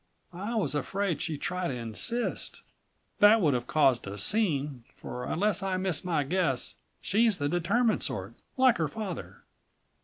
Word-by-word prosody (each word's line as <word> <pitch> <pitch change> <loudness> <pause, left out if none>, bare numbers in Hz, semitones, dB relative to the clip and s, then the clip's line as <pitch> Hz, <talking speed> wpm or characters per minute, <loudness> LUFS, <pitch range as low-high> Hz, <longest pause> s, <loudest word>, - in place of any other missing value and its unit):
I 205 +7 -4
was 215 -8 0
afraid 190 +4 -1
she'd 155 -3 -3
try 180 -1 -1
to - - -2
insist. 125 - -2 0.6
That 210 +2 +7
would 155 -8 +3
have 120 -1 -2
caused 135 -8 +3
a 100 +1 -6
scene, 145 - 0
for 125 - -6
unless 205 +3 +1
I 190 -1 -1
miss 185 -2 -1
my 165 -5 +1
guess 140 -4 0 0.3
she's 220 -1 +2
the 145 - -1
determined 200 +8 +1
sort 115 -6 -4 0.2
like 255 -2 +5
her 160 - +1
father." 190 +3 -6
175 Hz, 155 wpm, -29 LUFS, 140-205 Hz, 0.6 s, That